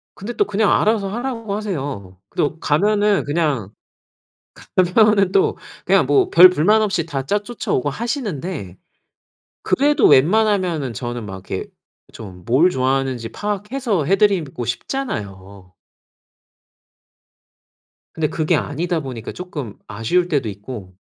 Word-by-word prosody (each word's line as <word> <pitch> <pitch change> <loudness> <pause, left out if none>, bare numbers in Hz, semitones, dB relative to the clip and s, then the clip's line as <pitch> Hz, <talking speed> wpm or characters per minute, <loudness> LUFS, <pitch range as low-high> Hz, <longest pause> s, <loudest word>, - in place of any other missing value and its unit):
근데 205 +5 -6
또 - - +1
그냥 205 +1 +1
알아서 210 -2 +2
하라고 230 -2 -4
하세요. 140 - -5
그래도 150 +7 -2
가면은 205 +6 +2
그냥 145 - -1 1.2
가면은 210 -4 +4
또 435 +2 +2 0.3
그냥 - - +4
뭐 390 -3 +3
별 180 +2 +9
불만 205 +6 +3
없이 195 -6 0
다 135 -2 -4
짜 205 - +1
쫓아오고 205 - -3
하시는데 185 - -4 0.9
그래도 290 0 +3
웬만하면은 175 - +3
저는 120 0 -5
막 95 -1 -9
이렇게 95 - -4 0.4
좀 95 -5 -11
뭘 135 - +4
좋아하는지 130 -4 -1
파악해서 210 - -2
해 190 +7 +2
드리고 185 - +1
싶잖아요. 100 - -5 2.4
근데 155 -1 -1
그게 160 +2 0
아니다 165 +4 -2
보니까 125 -5 -7
쪼끔 150 - -7
아쉬울 120 - 0
때도 140 -9 0
있고 100 -2 -8
165 Hz, 275 characters per minute, -20 LUFS, 125-210 Hz, 2.4 s, 별